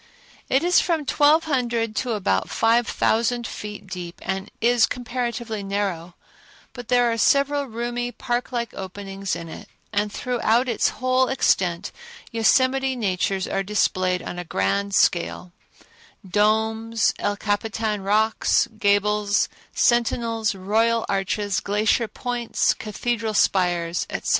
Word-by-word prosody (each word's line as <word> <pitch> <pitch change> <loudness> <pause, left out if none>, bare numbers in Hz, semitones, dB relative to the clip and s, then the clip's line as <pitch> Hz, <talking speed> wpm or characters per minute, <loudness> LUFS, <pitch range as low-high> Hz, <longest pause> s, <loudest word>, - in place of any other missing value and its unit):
It 265 - +2
is 355 +1 +5
from 325 -4 0
twelve 295 +4 +4
hundred 235 -6 -1
to 245 -3 -1
about 140 - 0
five 230 +1 +2
thousand 235 +1 +1
feet 210 -2 -7
deep, 180 -2 -7
and 190 0 -3
is 235 -1 +4
comparatively 235 -3 -4
narrow, 195 -4 -3 0.6
but 245 -3 -9
there 245 -1 +3
are 230 - -2
several 280 +4 +3
roomy, 240 0 -3
park 240 +1 -3
like 235 -2 -3
openings 195 0 -5
in 165 - -7
it, 160 - -10 0.2
and 205 0 0
throughout 245 +1 +1
its 235 - +1
whole 255 0 +1
extent 185 -8 +1 0.4
Yosemite 260 +3 +2
natures 195 -3 -1
are 195 - -1
displayed 185 -2 0
on 175 - -6
a - - -4
grand 195 - -1
scale—domes, 215 +6 -1
El 205 0 -1
Capitan 215 0 -1
rocks, 215 +3 +2
gables, 205 0 +2 0.2
Sentinels, 230 -2 +1
Royal 225 +4 +1
Arches, 200 0 -1
Glacier 215 +3 +1
Points, 245 0 -1
Cathedral 220 +1 -3
Spires, 175 -3 +1
etc. - - -4
220 Hz, 125 wpm, -23 LUFS, 195-240 Hz, 0.6 s, is